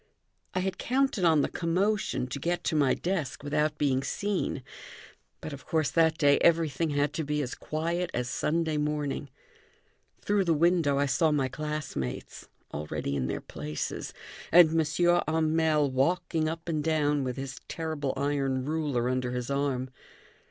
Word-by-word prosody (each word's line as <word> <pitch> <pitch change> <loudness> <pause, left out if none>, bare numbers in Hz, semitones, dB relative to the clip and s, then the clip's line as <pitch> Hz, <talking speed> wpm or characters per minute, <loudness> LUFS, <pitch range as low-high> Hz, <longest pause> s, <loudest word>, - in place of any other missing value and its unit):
I 185 - +1
had 190 0 -2
counted 260 -5 +1
on 160 -3 +5
the - - +1
commotion 180 -5 0
to 140 - -4
get 175 +4 -1
to - - 0
my 145 -3 +3
desk 170 -8 -3
without 150 +1 0
being 135 -3 +2
seen; 195 -5 -2 0.8
but, 155 - -6
of 140 - -10
course, 155 -3 +1
that 160 -1 +3
day 145 -2 +4
everything 165 -2 +2
had 145 0 0
to 160 - -2
be 150 0 -1
as 125 - -4
quiet 170 +3 -2
as 125 0 -2
Sunday 160 +4 0
morning. 150 -1 -2 0.9
Through 205 -2 +1
the 165 -2 +3
window 165 -3 +3
I 140 - +3
saw 140 +4 +2
my 135 -3 +1
classmates, 150 - -5 0.3
already 75 -1 -3
in 65 -2 -1
their - - -3
places, 75 0 -5 0.4
and 170 -1 +8
M. 165 +2 +3
Hamel 155 -2 +2
walking 160 +3 +1
up 165 +1 -6
and 155 -3 -1
down 150 -2 +1
with 125 0 -3
his 135 0 -5
terrible 155 -4 -3
iron 135 -2 0
ruler 145 -6 0
under 125 -1 -1
his 125 +1 -3
arm. 135 -2 -1
150 Hz, 160 wpm, -28 LUFS, 135-165 Hz, 0.9 s, and